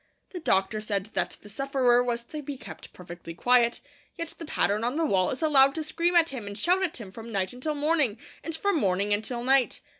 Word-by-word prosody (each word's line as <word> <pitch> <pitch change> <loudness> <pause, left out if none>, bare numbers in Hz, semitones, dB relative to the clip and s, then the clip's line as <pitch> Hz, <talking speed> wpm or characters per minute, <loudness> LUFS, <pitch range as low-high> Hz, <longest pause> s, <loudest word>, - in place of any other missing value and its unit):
The 360 - -6
doctor 215 - +1
said 205 -1 -3
that 190 -2 -2
the - - -12
sufferer 250 +1 +2
was 235 -1 -2
to 300 +5 -7
be 285 -1 -6
kept - - -11
perfectly 175 -2 -10
quiet; 240 +3 +3 0.4
yet 335 -1 -4
the 330 - -9
pattern 210 -7 +1
on 245 +3 -1
the 325 +1 +1
wall 190 -9 +2
is 270 +4 -4
allowed 275 -3 +5
to 320 - -2
scream 340 +3 0
at 335 -1 +5
him 240 -7 -6
and 200 0 -6
shout 360 - +2
at 365 -4 -1
him 210 -6 -9
from 225 +3 -9
night 190 -1 -1
until 295 +5 -3
morning, 290 -6 +1 0.3
and 325 - -3
from 400 +2 0
morning 200 -1 +1
until 235 +3 -3
night. 265 0 +2
245 Hz, 220 wpm, -27 LUFS, 205-305 Hz, 0.4 s, allowed